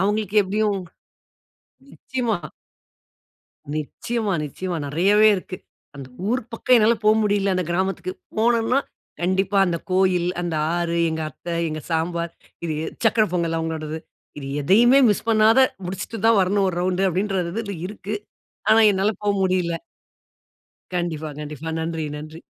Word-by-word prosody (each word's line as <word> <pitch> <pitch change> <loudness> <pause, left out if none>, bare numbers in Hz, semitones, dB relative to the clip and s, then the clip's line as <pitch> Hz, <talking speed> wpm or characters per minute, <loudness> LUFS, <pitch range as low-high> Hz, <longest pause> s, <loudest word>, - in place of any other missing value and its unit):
அவுங்களுக்கு 210 +1 0
எப்படியும் 205 +1 0 1.2
நிச்சயமா. 240 -6 -2 1.4
நிச்சயமா, 210 +7 -2
நிச்சயமா, 175 +4 -4
நெறையவே 200 +9 +4
இருக்கு. 185 0 -6 0.4
அந்த 135 -2 -8 0.2
ஊர் 250 +1 +1
பக்கம் 250 +2 +3
என்னால 225 +1 +5
போ 215 - +6
முடியல. 200 -2 +1
அந்த 185 - 0
கிராமத்துககு. 190 - -1 0.2
போனோம்னா, 235 +3 +3 0.4
கண்டிப்பா 190 +2 +1
அந்த 170 -1 -1
கோயில், 185 -2 +2
அந்த 170 -2 -2 0.2
ஆறு, 170 -1 -1
எங்க 160 0 -2
அத்தை, 170 -1 -6
எங்க 155 0 -4
சாம்பார், 170 +1 -1 0.3
இது 165 - -1
எ - - -3 0.2
சக்கரை 220 -1 +4
பொங்கல் 165 -2 0
அவுங்களோடது. 160 -1 -3 0.4
இது 135 - -7 0.2
எதையுமே 240 - +5
மிஸ் 205 - -1
பண்ணாத, 225 +3 +5 0.3
முடிச்சிட்டு 195 +5 -5
தான் 225 -3 +5
வரணும் 195 +1 +2
ஒரு 175 - -3
ரவுண்ட்டு. 185 +1 +1
அப்டின்றது 195 +2 -2
இருக்கு, 205 +1 -6 0.6
ஆனா 225 +1 +7
என்னால 195 +3 +1
போ 205 - -1
முடில. 185 -2 +1 1.2
கண்டிப்பா, 160 -3 -2
கண்டிப்பா. 150 +1 -6
நன்றி, 160 -1 -3
நன்றி. 155 +2 -9
190 Hz, 130 wpm, -23 LUFS, 170-215 Hz, 1.4 s, ஆனா